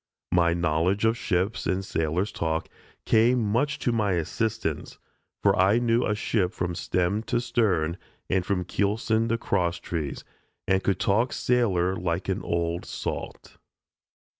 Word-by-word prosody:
My 85 -1 +3
knowledge 85 +5 +1
of 110 +1 +3
ships 100 +2 -1
and 95 +1 -1
sailor's 80 +4 -1
talk 80 0 -2 0.4
came 120 +3 +4
much 120 +7 0
to 120 - 0
my 105 -4 +1
assistance, 95 0 -2 0.5
for - - +4
I 95 +4 +4
knew 120 0 +2
a 105 - +1
ship 105 -3 0
from 90 -1 -2
stem 90 +4 0
to 120 - 0
stern, 100 -9 0 0.3
and 95 -1 +1
from 90 -1 -1
keelson 110 +4 0
to 115 - +1
cross 90 -6 0
trees, 80 -5 -4 0.4
and 95 0 +2
could 95 -2 +1
talk 115 +6 +2
sailor 95 -7 +1
like 85 +1 -2
an 95 - -1
"old 85 0 -1
salt." - - -6
95 Hz, 145 wpm, -26 LUFS, 85-115 Hz, 0.5 s, came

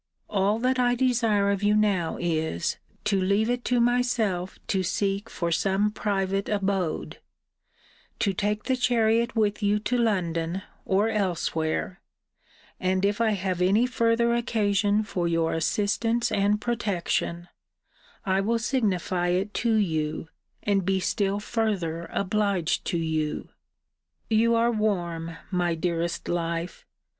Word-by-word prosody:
All 200 +1 +2
that 255 +2 +1
I 245 -1 +3
desire 230 -5 +2
of 200 -1 -1
you 210 0 +3
now 200 -6 +1
is, 160 - -1 0.3
to 200 -2 +1
leave 200 +5 +2
it 245 0 -2
to 250 -1 +2
myself 235 -7 +1
to 190 - 0
seek 195 +2 -1
for 170 -1 -2
some 195 +5 +1
private 195 -2 -1
abode: 195 -5 -1 1.0
to 200 - +1
take 210 +2 -1
the 260 - +1
chariot 235 -1 +2
with 210 -2 +1
you 205 0 +2
to 245 +3 0
London, 180 -5 0 0.2
or 200 +4 +2
elsewhere: 180 -4 -1 0.8
and, 185 +1 +1
if 205 +2 0
I 225 - +3
have 185 -2 -2
any 200 +6 +4
further 235 -1 +2
occasion 210 -3 +1
for 180 -4 -2
your 165 -1 +1
assistance 215 +7 0
and 205 +1 +2
protection, 200 -6 -2 0.8
I 190 -1 +2
will 230 +4 +1
signify 195 -7 0
it 190 +4 0
to 230 -2 +2
you, 160 -6 -1 0.3
and 200 -2 +1
be 190 +1 +1
still 200 +2 0
further 195 -7 -2
obliged 200 -3 0
to 170 - -1
you. 155 -2 -2 0.8
You 230 +1 +4
are 230 +1 +3
warm, 175 -7 -2
my 175 -2 +1
dearest 170 0 -2
life! 170 0 -3
200 Hz, 130 wpm, -26 LUFS, 175-220 Hz, 1.0 s, any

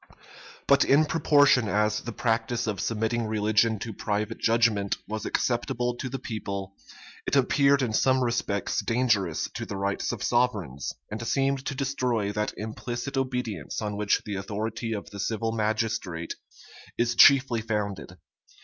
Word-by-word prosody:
But 140 0 +5
in 145 +3 +4
proportion 145 -6 +4
as 105 +1 +1
the 120 - -6
practice 115 +1 -1
of 105 -3 -2
submitting 115 +1 -1
religion 110 +1 +2
to 115 - -5
private 105 +2 -2
judgment 115 -3 +2
was 110 0 -4
acceptable 120 0 -1
to 130 - -4
the 135 - -4
people, 100 -5 -5 0.5
it - - +1
appeared 140 +1 +4
in 115 -4 -1
some 130 +3 +3
respects 115 -4 -1
dangerous 115 -8 +1
to - - -4
the 100 - -5
rights 100 +1 -1
of - - -5
sovereigns, 105 - 0 0.2
and 110 +2 -4
seemed 135 +1 +1
to 145 - -2
destroy 125 -6 -1
that 105 +1 -1
implicit 120 +5 -5
obedience 125 - -2
on 105 -1 -3
which 105 0 +1
the 105 - -4
authority 110 +3 -4
of 100 -2 -6
the 100 - -8
civil 110 +2 -1
magistrate 110 -6 -2 0.6
is 120 0 +1
chiefly 130 -2 +6
founded. 105 -4 -3
115 Hz, 150 wpm, -27 LUFS, 105-125 Hz, 0.6 s, chiefly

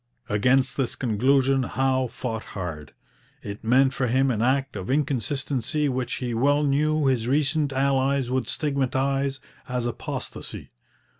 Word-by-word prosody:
Against 125 +6 +2
this 130 -4 0
conclusion 135 +3 +2
Howe 130 +1 0
fought 115 -2 -5
hard. 80 -6 -6 0.5
It 100 0 -7
meant 130 +4 +4
for 130 - 0
him 130 +2 +2
an 110 -3 -1
act 135 +2 +1
of 95 - -5
inconsistency 140 0 0
which 130 -1 -2
he 125 -2 -3
well 145 +5 +2
knew 150 +2 +2
his 125 -4 +1
recent 145 +2 +1
allies 135 -1 +1
would 130 0 0
stigmatize 135 -1 0 0.3
as 125 -1 -1
apostasy. 120 - -6
130 Hz, 135 wpm, -25 LUFS, 125-140 Hz, 0.5 s, meant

